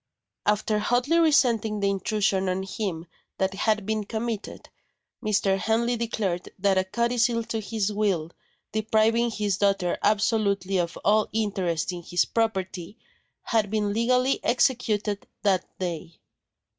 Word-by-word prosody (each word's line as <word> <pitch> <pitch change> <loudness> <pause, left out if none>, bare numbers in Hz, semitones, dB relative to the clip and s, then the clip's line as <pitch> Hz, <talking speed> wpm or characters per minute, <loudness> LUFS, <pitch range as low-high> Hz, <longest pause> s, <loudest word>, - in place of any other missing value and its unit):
After 210 0 +2
hotly 245 +9 +2
resenting 235 -9 +3
the 200 - +1
intrusion 195 -1 0
on 185 +1 -1
him 190 -4 -4 0.3
that 190 0 0
had 215 +1 0
been 215 0 -1
committed, 220 0 -5 0.5
Mr. 200 -2 +1
Henley 235 +3 +1
declared 210 -6 -2
that 195 0 +2
a - - +2
codicil 235 +3 +1
to 225 0 -3
his 210 -1 -2
will, 190 -6 0 0.4
depriving 220 +2 +2
his 210 -4 -1
daughter 195 -3 +1
absolutely 200 -3 +1
of 170 0 -2
all 215 +1 +3
interest 190 -7 -1
in 175 -1 -6
his 175 +1 +1
property, 195 -3 -2 0.5
had 220 -3 +1
been 210 -1 0
legally 250 +4 +2
executed 220 -5 +1 0.2
that 190 -3 +2
day. 170 -2 -5
210 Hz, 130 wpm, -26 LUFS, 190-225 Hz, 0.5 s, resenting